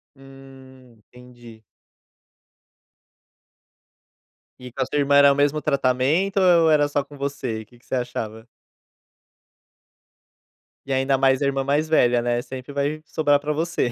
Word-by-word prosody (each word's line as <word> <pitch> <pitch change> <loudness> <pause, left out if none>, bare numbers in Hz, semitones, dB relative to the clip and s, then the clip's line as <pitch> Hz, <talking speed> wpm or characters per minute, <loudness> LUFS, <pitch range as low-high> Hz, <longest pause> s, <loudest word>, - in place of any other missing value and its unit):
Hum, 135 -2 -16
entendi. 120 0 -16 3.0
E 125 0 -11
com 130 - -6
a - - +1
sua 145 - -4
irmã 140 0 +2
era 140 0 +7
o - - -5
mesmo 145 +2 +1
tratamento 140 +8 0
ou 175 -3 +4
e - - +5
era 145 -1 +3
só 145 -1 -1
com 145 0 -15
você? 135 -5 -4
O 110 - -13
que 120 +3 -22
que 120 - -29
você - - -3
achava? 110 -3 -5 2.4
E 135 - -3
ainda 135 +1 +1
mais 135 0 +2
a 140 - +1
irmã 135 -1 -1
mais 145 +3 0
velha, 120 -6 +3
né. 120 0 -1
Sempre 130 +1 -9
vai 145 +2 -2
sobrar 145 -2 +1
pra 150 +1 -4
você. 160 -4 -1
135 Hz, 150 wpm, -22 LUFS, 125-145 Hz, 3.0 s, era